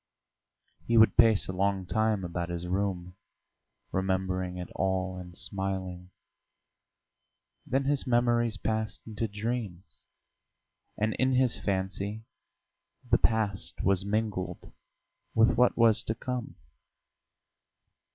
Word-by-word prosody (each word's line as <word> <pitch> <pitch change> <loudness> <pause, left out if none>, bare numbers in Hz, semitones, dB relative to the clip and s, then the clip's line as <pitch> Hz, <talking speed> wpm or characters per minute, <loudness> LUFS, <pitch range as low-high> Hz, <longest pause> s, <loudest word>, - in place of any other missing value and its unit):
He 115 - +3
would 110 0 +6
pace 115 -3 +5
a - - -2
long 95 0 0
time 110 0 +1
about 85 0 -3
his 85 0 -4
room, 90 -1 -2 0.8
remembering 95 -1 -1
it 90 -1 -6
all 95 -1 0
and 90 -1 -9
smiling; 95 -2 -3 1.6
then 135 +2 +1
his 140 0 0
memories 120 -2 +2
passed 110 0 -2
into 110 0 -3
dreams, 105 -5 -5 0.9
and 110 +1 +1
in 130 0 +3
his 125 -2 +3
fancy 100 +2 -2 0.9
the - - +5
past 105 -4 0
was 95 -1 +4
mingled 105 -2 -3 0.6
with 110 +1 +5
what 125 +2 +3
was 115 -2 +5
to 110 - -1
come. 125 +1 -4
100 Hz, 110 wpm, -29 LUFS, 95-115 Hz, 1.6 s, would